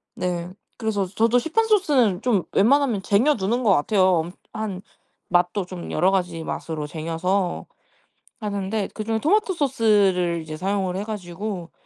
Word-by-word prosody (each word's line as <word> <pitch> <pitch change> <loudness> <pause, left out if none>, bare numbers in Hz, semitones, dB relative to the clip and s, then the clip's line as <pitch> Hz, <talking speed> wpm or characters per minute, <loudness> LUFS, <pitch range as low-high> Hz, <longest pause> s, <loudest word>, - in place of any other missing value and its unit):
네. 175 -1 -3 0.3
그래서 215 -3 -1
저도 225 +6 +2
시판 445 - 0
소스는 275 - +3
좀 225 -8 +1
웬만하면 240 -1 +3
쟁여 240 +11 +3
두는 225 +5 -1
것 215 - +4
같아요. 185 +2 +3
음 175 - -8 0.2
한 200 -3 -4 0.5
맛도 180 +2 +1
좀 180 -1 -8
여러 180 +4 +3
가지 175 -4 -1
맛으로 160 -2 -4
쟁여서 165 +5 -2 0.7
하는데 205 -1 -2
그중에 220 +1 -2
토마토 390 - +2
소스를 205 - +2
이제 155 -1 -7
사용을 190 +1 -1
해 195 - -2
가지고 190 -3 -5
200 Hz, 305 characters per minute, -23 LUFS, 180-225 Hz, 0.7 s, 것